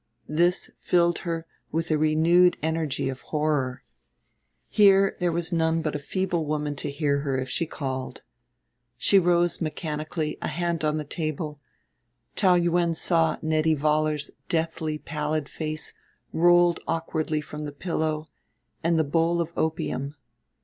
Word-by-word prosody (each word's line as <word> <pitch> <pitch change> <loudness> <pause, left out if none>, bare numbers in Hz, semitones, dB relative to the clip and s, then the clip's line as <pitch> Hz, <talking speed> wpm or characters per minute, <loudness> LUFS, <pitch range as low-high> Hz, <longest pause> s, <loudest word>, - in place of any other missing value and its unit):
This 175 +4 +2
filled 175 -1 +2
her 165 -2 -3 0.3
with 165 +1 -1
a 155 - +3
renewed 165 +3 +4
energy 160 -4 -1
of 130 0 -4
horror.... 145 -5 -1 0.8
Here 195 -2 +5
there 175 -1 +1
was 170 +1 -2
none 160 0 +1
but 155 - -1
a - - -1
feeble 180 +2 -1
woman 150 -1 -1
to - - -3
hear 140 0 0
her 140 -2 -1
if 130 0 -3
she 165 - 0
called. 130 -4 -5 0.7
She 195 - +5
rose 175 -1 +2
mechanically, 155 0 -3
a - - -2
hand 170 -1 -2
on 155 0 +1
the 155 - -2
table; 155 -1 -4 0.8
Taou 185 -3 +4
Yuen 170 -1 +1
saw 165 -1 +2
Nettie 155 0 +2
Vollar's 150 0 0 0.2
deathly 160 -2 -1
pallid 150 -1 -3
face 155 0 -4 0.4
rolled 175 0 +5
awkwardly 160 -1 -1
from 150 0 -7
the 145 - -5
pillow, 155 0 -2 0.6
and 170 0 +2
the 160 - +3
bowl 165 +3 +1
of 170 0 -2
opium. 150 -3 -2
160 Hz, 145 wpm, -26 LUFS, 150-170 Hz, 0.8 s, Here